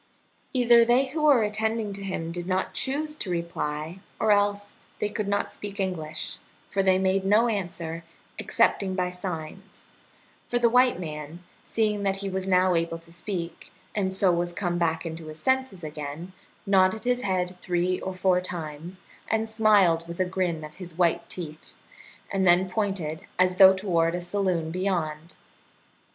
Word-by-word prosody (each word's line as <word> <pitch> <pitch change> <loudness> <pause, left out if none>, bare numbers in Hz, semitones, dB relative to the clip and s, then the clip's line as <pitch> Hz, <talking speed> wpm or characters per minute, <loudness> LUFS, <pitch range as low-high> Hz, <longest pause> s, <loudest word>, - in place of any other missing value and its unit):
Either 240 -2 +6
they 240 +3 +4
who 310 +3 -3
were 285 -7 +5
attending 215 0 -1
to 200 - -6
him 175 -4 -3
did 175 +1 -5
not 185 0 -1
choose 300 +3 -1
to 220 - -5
reply, 170 -1 -3 0.2
or 220 - +3
else 205 0 +2 0.3
they - - 0
could 210 -1 -3
not 200 0 0
speak 205 -1 -7
English, 160 -5 -3 0.3
for 195 - +2
they 190 -1 +4
made 190 0 +1
no 210 +5 +4
answer, 170 -6 -3 0.4
excepting 190 -2 +1
by 180 -1 0
signs; 180 +1 -7 0.6
for 245 - +1
the 235 -1 +3
white 250 -3 +4
man, 155 0 -7 0.2
seeing 210 -2 0
that 195 -1 +1
he 195 0 -4
was 190 0 -3
now 185 0 +4
able 165 0 0
to 165 0 -18
speak, 170 -1 -6 0.2
and 195 -3 0
so 190 -1 +3
was 175 0 -1
come 175 -1 -1
back 165 0 0
into 160 -1 -6
his 155 0 -9
senses 260 -9 0
again, 150 +3 -6 0.3
nodded 195 +1 +3
his 250 0 +1
head 185 -4 -1
three 180 0 0
or 190 0 -5
four 185 -1 +2
times, 170 +1 -6 0.3
and 220 0 +1
smiled 205 -7 +3
with 170 +1 -8
a 185 - +3
grin 180 -3 -1
of 155 0 -10
his 175 -3 -8
white 170 -1 +1
teeth, 155 -3 -8 0.6
and 190 -1 +1
then 175 +2 +5
pointed, 185 -6 -3
as 185 0 +3
though 190 0 +9
toward 170 -3 +1
a 175 - -3
saloon 175 -3 -1
beyond. 170 -3 -2
185 Hz, 170 wpm, -26 LUFS, 170-205 Hz, 0.6 s, though